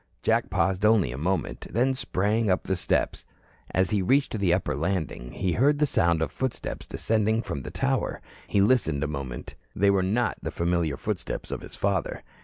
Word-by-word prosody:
Jack - - +2
paused 95 +1 +1
only 105 - +4
a 65 - -5
moment, 90 +1 -2
then 125 +4 +2
sprang 110 -3 0
up 95 - +2
the 95 - -1
steps. 90 - 0 0.5
As 95 0 +1
he 105 -2 +2
reached 130 +2 +2
the 95 -3 +2
upper 85 -6 +1
landing, 80 -6 -2
he 95 -2 -1
heard 140 - +3
the 150 - +3
sound 85 - +2
of 75 - -3
footsteps 130 +5 -4
descending 110 +1 +1
from 70 - -4
the - - -7
tower. - - -1 0.3
He 100 - +2
listened 100 - +3
a - - 0
moment. 70 -5 -5 0.2
They 100 +1 +4
were 100 -1 +3
not 110 +6 0
the - - -3
familiar 85 -4 0
footsteps - - -4
of - - -3
his - - -8
father. 100 -3 -1
95 Hz, 190 wpm, -26 LUFS, 85-110 Hz, 0.5 s, only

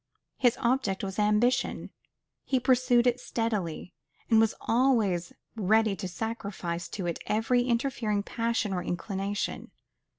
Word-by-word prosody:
His 245 -3 +3
object 235 -6 +1
was 195 +1 -4
ambition: 210 +4 +1 0.5
he 260 - +1
pursued 250 -1 +3
it 245 0 +2
steadily; 205 -9 -3 0.4
and 225 - +6
was 225 0 +3
always 225 -8 +2 0.2
ready 215 0 +2
to 185 - -4
sacrifice 185 -4 -4
to 190 - -5
it 170 -1 -2
every 245 +3 +2
interfering 235 -4 0
passion 230 -2 -1
or 180 - -1
inclination. 195 +3 -3
220 Hz, 125 wpm, -28 LUFS, 195-240 Hz, 0.5 s, and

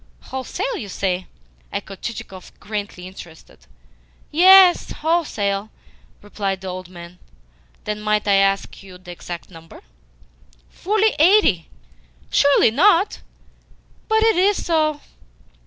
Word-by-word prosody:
"Wholesale, 265 - -5
you 205 - -7
say?" 185 -1 -3 0.4
echoed 195 -1 -7
Chichikov, 190 -5 -8
greatly 205 -3 -6
interested. 175 -3 -13 0.7
"Yes, 365 +3 +6
wholesale," 220 -11 -1 0.5
replied 200 -2 -4
the 190 - -6
old 185 -1 -7
man. 175 0 -12 0.6
"Then 210 0 -4
might 210 0 -1
I 200 - +3
ask 195 0 0
you 190 -2 -13
the 180 -1 -12
exact 175 +1 -9
number?" 165 -1 -14 0.9
"Fully 430 +3 0
eighty." 315 - +4 0.6
"Surely 280 -5 +4
not?" 360 - +2 0.9
"But 440 0 +3
it 450 -5 +3
is 395 +2 +1
so." 310 -3 0
210 Hz, 110 wpm, -20 LUFS, -, 0.9 s, Yes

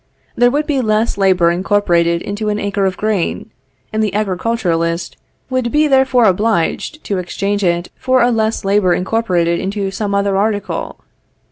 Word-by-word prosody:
There 245 +1 +4
would 295 +4 0
be 285 -4 0
less 220 0 +1
labor 185 -4 +3
incorporated 175 -2 +1
into 210 +1 -3
an 210 - -1
acre 200 -1 -1
of 185 -1 -3
grain, 210 -5 -2 0.4
and 215 - 0
the 205 -2 -2
agriculturist 180 -5 -1 0.4
would 255 -2 -1
be 300 +1 +3
therefore 265 -3 +3
obliged 210 - 0
to 200 -2 -2
exchange 200 +3 -2
it 175 -1 0
for 255 -1 +2
a 245 - +3
less 220 -2 -1
labor 195 -2 +3
incorporated 180 -4 0
into 195 0 -3
some 200 0 -2
other 200 0 +1
article. 205 +1 -2
205 Hz, 155 wpm, -16 LUFS, 185-225 Hz, 0.4 s, There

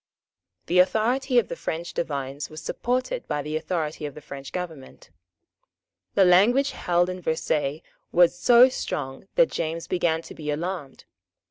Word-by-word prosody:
The 180 +1 +2
authority 245 +7 +2
of 230 -6 +4
the - - -5
French 165 +1 -4
divines 140 -2 -3
was 155 - -9
supported 255 - -2
by 145 - -2
the 150 +1 -4
authority 155 -2 -2
of 145 - -10
the - - -8
French 140 -2 -9
government. 160 - -7 1.0
The 195 - +6
language 235 +10 +5
held 175 0 +1
at 180 -1 -8
Versailles 155 -2 -1 0.3
was 175 0 +5
so 240 +7 +7
strong 135 - -5
that - - +4
James 165 +1 -3
began 165 -2 0
to - - -10
be 150 -1 -6
alarmed. 155 -2 -4
170 Hz, 150 wpm, -25 LUFS, 150-195 Hz, 1.0 s, so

